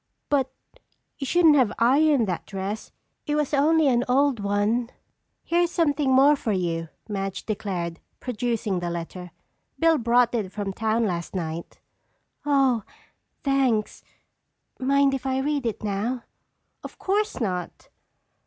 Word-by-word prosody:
But 270 -3 +1 0.7
you 275 - -3
shouldn't 325 -3 +5
have 250 -6 +3
ironed 275 +1 +4
that 180 -2 -3
dress. 195 +2 -5 0.4
It 295 - 0
was 300 -1 -1
only 305 +2 +4
an 245 -2 +3
old 270 -1 +3
one." 205 +4 0 0.5
"Here's 345 +1 +2
something 295 -5 +1
more 275 +3 +6
for 235 -5 -2
you," 165 -3 -2 0.2
Madge 195 -2 -4
declared, 180 -5 -3 0.2
producing 230 -5 -2
the 175 0 -3
letter. 175 +1 -6 0.5
"Bill 325 -1 +3
brought 240 +1 +3
it 210 -6 -2
from 200 -1 -4
town 225 +2 0
last 175 -2 -3
night." 165 -1 -4 0.7
"Oh, 270 -5 +3 0.6
thanks. 265 -6 +1 0.8
Mind 275 +1 +3
if 270 0 -3
I 260 0 0
read 280 -1 0
it 220 - -4
now?" 215 +5 -2 0.6
"Of - - -9
course 415 0 -1
not." 180 -6 -4
240 Hz, 135 wpm, -25 LUFS, 200-280 Hz, 0.8 s, more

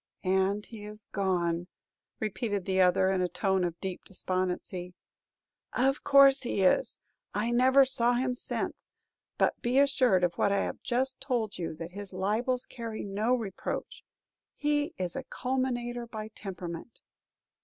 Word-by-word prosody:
"And 190 +2 +1
he 220 -3 -10
is 210 0 -9
gone!" 175 -3 0 0.5
repeated 205 -2 -2
the 190 -1 +2
other, 185 +1 +4
in 190 -1 +1
a 180 - +2
tone 190 -1 +1
of 170 -1 -2
deep 190 -2 -5
despondency. 185 -1 -3 0.8
"Of 270 +3 +1
course 275 -1 +7
he 220 -6 0
is. 345 - +3 0.4
I 220 +3 0
never 260 +3 +6
saw 245 -2 +2
him 250 +1 +1
since; 250 - -4 0.5
but - - +1
be 245 +2 +1
assured 260 -9 +4
of 175 -1 +2
what 200 - +3
I 200 0 +2
have - - -4
just 260 +2 0
told 240 -8 -1
you, 165 -2 -3
that 165 +2 -7
his 200 0 -8
libels 225 +7 0
carry 230 -2 -6
no 210 +5 +1
reproach. 215 -6 -5 0.5
He 295 +3 0
is 180 -4 -2
a - - -3
calumniator 245 -2 -2
by 215 -1 -6
temperament." 185 -1 -7
210 Hz, 150 wpm, -29 LUFS, 185-250 Hz, 0.8 s, course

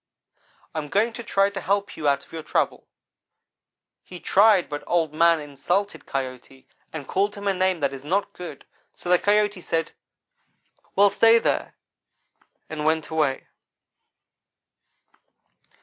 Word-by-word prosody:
I 160 - -2
am 150 -1 -6
going 220 +6 +1
to 235 - -7
try 200 -2 +2
to 195 -1 -5
help 200 +2 -1
you 150 - -2
out 140 0 +1
of - - -25
your 165 - -5
trouble.' 155 - -1 1.2
He 180 - -10
tried 200 -1 +4
but 145 -1 -6
Old 165 -3 +1
man 165 +1 +4
insulted 155 +8 -2
Coyote. 130 0 -6 0.2
and 145 -4 -7
called 200 +2 0
him 200 0 -6
a 195 - +3
name 185 -2 0
that 140 -1 0
is 135 0 -8
not 190 +7 -1
good, 180 -1 -9 0.3
so 175 - -8
the 180 - +6
Coyote 205 -1 +2
said, 165 -1 -2 1.0
'Well, 200 0 +5
stay 225 0 +6
there,' - - -1 0.9
and 155 -1 -5
went 160 +1 0
away. 150 -4 0
175 Hz, 145 wpm, -24 LUFS, 150-200 Hz, 1.2 s, the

